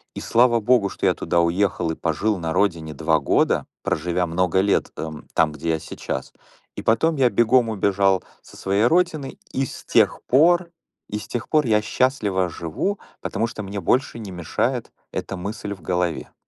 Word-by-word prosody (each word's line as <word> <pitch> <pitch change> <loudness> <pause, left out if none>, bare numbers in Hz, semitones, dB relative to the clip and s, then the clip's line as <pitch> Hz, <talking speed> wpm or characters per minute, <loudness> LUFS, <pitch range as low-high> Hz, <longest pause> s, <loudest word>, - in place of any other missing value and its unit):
И - - -4
слава 120 0 +3
богу, 110 -2 +3
что - - -4
я - - +4
туда 85 - +1
уехал 85 0 +1
и - - -4
пожил 95 +7 0
на 80 -2 -3
родине 85 -6 0
2 80 +2 +1
года, 70 - +2 0.2
проживя 90 0 0
много 90 +2 +1
лет, 100 +1 +1
эм, 80 -1 -6
там, 80 -2 +3
где 80 +2 -3
я 80 - 0
сейчас. 80 - -5 0.4
И - - -5
потом 155 +8 +2
я 130 -2 +4
бегом 120 0 +3
убежал 100 -2 +2 0.2
со - - -16
своей 100 +3 +1
родины, 160 -2 +1
и 135 0 0
с - - -10
тех - - +2
пор 170 +6 +4 0.4
и 105 - -3
с 105 - -10
тех 120 - -4
пор 150 -4 +3
я 105 -1 +3
счастливо 105 -9 +1
живу, 85 - -3 0.2
потому 110 +3 -1
что 115 -2 -7
мне 100 0 -5
больше 125 +7 +1
не 105 -4 -7
мешает 85 -2 -2 0.2
эта 100 - -4
мысль 100 +2 -5
в 95 - -19
голове. 90 -1 -2
100 Hz, 180 wpm, -22 LUFS, 85-120 Hz, 0.4 s, я